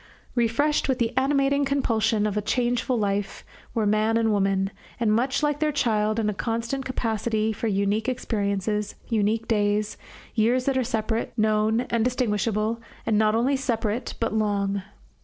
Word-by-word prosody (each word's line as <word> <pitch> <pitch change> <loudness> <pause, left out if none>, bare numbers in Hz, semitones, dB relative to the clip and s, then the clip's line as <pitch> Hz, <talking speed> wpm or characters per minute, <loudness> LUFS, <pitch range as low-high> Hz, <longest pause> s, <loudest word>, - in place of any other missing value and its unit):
Refreshed 260 +6 +1
with 260 - +2
the 235 0 -1
animating 275 +1 +2
compulsion 225 -6 +1
of 210 0 -1
changeful 245 +2 0
life 200 -2 -2 0.3
were 220 -2 +1
man 215 +2 +2
and 225 -1 +2
woman, 195 -1 +1 0.3
and 220 -3 +2
much 255 +6 +1
like 295 -1 +1
their 305 -1 +1
child 215 -6 +1
in 220 -2 +1
a 210 - 0
constant 230 +5 -2
capacity 220 -3 -1
for 225 - -3
unique 200 +3 +1
experiences, 210 -3 -1
unique 220 0 +1
days, 210 -1 +1 0.4
years 240 +3 +2
that 275 - +1
are 260 - +2
separate, 225 -1 -2
known, 215 +1 +2
and 235 -2 0
distinguishable, 230 -2 0 0.2
and 215 -2 +2
not 215 0 +3
only 255 +5 +2
separate 235 -4 -2
but 230 - -1
long. 200 -2 0
225 Hz, 155 wpm, -25 LUFS, 210-245 Hz, 0.4 s, not